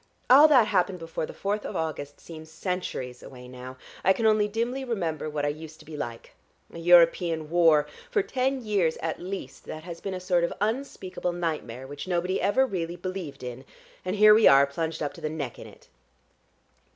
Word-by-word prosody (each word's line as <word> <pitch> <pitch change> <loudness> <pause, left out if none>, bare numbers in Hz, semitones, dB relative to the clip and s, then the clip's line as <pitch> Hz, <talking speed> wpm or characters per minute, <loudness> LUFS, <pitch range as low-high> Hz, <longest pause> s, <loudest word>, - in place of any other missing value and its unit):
All 285 +4 +9
that 260 -7 +6
happened 185 -2 +1
before 165 -2 -4
the - - -8
fourth 205 +1 -2
of - - -6
August 145 -3 -4
seems 160 -1 -11
centuries 160 -7 -4
away 125 -2 -11
now. 130 +1 -10 0.3
I 190 - +5
can 225 - -2
only 215 -1 +4
dimly 235 +5 -2
remember 170 - -2
what 150 -1 -2
I - - +1
used 155 +1 -8
to - - -16
be 155 - -9
like. 120 -5 -6 0.4
A 170 - -8
European 165 -2 +4
war! 165 -4 +5 0.2
For 415 - +1
ten 265 -4 -1
years 190 -7 +1
at 160 -1 -2
least 190 +2 -7
that 155 - -7
has 170 -1 -8
been 195 -1 -4
a - - -4
sort 180 -1 +1
of 170 - 0
unspeakable 210 -5 -2
nightmare, 155 -8 -4
which 145 +5 -8
nobody 180 +1 0
ever 260 +7 +3
really 175 -7 -3
believed 175 -8 -6
in, 125 +1 -7 0.4
and 185 +2 -2
here 210 0 +8
we 220 +1 +6
are 140 0 +7
plunged 160 +3 -3
up 145 - -3
to 170 - -13
the 155 - -2
neck 145 -6 -5
in - - -9
it." - - -17
170 Hz, 200 wpm, -27 LUFS, 150-200 Hz, 0.4 s, All